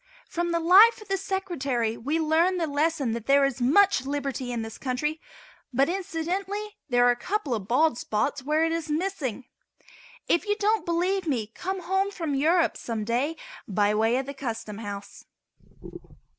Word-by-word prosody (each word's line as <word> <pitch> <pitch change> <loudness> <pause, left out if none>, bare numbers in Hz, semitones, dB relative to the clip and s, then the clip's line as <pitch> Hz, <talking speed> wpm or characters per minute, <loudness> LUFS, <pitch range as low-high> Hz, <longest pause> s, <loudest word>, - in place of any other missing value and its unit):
From 345 0 -2
the 335 - +1
life 395 +8 +7
of 425 -2 -14
the 390 - +1
Secretary 280 - -2
we 290 +8 -2
learn 325 +4 +2
the 340 - 0
lesson 295 -3 0
that 230 -1 -5
there 280 0 +5
is 265 -2 -2
much 320 +4 +4
Liberty 275 -2 -3
in 235 -2 -2
this 225 0 -8
country, 300 +5 -2 0.5
but, 275 +4 +2
incidentally, 385 +4 -3
there 245 -1 +4
are 245 - +6
a - - 0
couple 340 - -2
of 205 -4 -3
bald 260 +2 +2
spots 245 +6 -1
where 305 +4 +1
it 325 - 0
is 330 -1 -3
missing. 300 - -2 0.8
If 345 +5 +1
you 415 - +2
don't 425 -1 0
believe 360 +2 0
me 245 -8 0
come 380 0 -4
home 385 +2 +1
from 330 -7 -4
Europe 325 +5 +2
some 225 -2 -4
day 250 +8 0 0.3
by 205 +1 +2
way 225 +3 +2
of 265 - -2
the 280 - -6
Custom 225 -6 -5
House. 200 -2 -8
300 Hz, 175 wpm, -26 LUFS, 245-360 Hz, 0.8 s, life